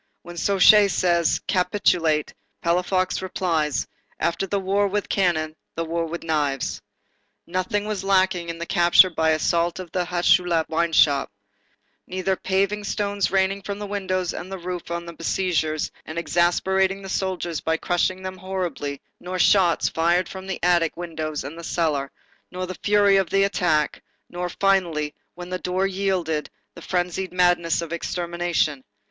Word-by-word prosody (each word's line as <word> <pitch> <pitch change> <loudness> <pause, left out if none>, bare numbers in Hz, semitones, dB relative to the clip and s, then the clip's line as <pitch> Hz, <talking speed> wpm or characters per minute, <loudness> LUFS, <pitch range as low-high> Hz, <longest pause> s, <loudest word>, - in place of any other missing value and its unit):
When 175 0 -10
Suchet 200 +3 +6
says:—"Capitulate,"—Palafox 180 0 0
replies: 165 -6 -1 0.3
"After 170 +3 -1
the 200 +1 0
war 200 +2 +1
with 205 +1 -2
cannon, 155 -5 0 0.2
the 165 - -2
war 165 0 -2
with 170 +2 -6
knives." 145 -4 -1 0.6
Nothing 185 +4 -2
was 210 -3 -3
lacking 185 -3 +2
in 165 - -4
the 170 - -5
capture 175 +1 +5
by 160 -1 +1
assault 170 +2 +1
of 180 -3 -8
the 180 -1 -1
Hucheloup 175 -1 +2
wine 165 +1 0
shop; 140 -3 +4 0.8
neither 185 +1 -1
paving 195 +3 0
stones 200 -1 -1
raining 195 +1 +1
from 200 +1 -5
the 205 - -5
windows 185 -3 -2
and 185 +2 -7
the 190 - -4
roof 180 -1 -6
on 170 0 -4
the 170 - -8
besiegers 160 -2 -1
and 155 - -8
exasperating 190 +3 +1
the - - -7
soldiers 185 -4 -2
by 160 0 0
crushing 185 +2 0
them 185 0 -5
horribly, 175 -7 -4 0.2
nor 185 +1 -5
shots 180 -2 +4
fired 170 +2 +1
from 190 0 -9
the 190 - -3
attic 175 -2 +2
windows 160 -3 -4
and 150 +5 -8
the - - -8
cellar, 150 -5 -1 0.4
nor 185 0 -4
the 185 - -6
fury 205 -1 +4
of 190 -3 0
attack, 180 -6 +1 0.3
nor, 175 0 -3
finally, 175 -6 +1 0.2
when 175 0 -8
the 185 - -2
door 185 +1 0
yielded, 185 -5 -1 0.2
the - - -12
frenzied 180 +1 -2
madness 175 -2 +2
of 170 0 -6
extermination. 170 -4 -1
180 Hz, 150 wpm, -23 LUFS, 165-190 Hz, 0.8 s, Suchet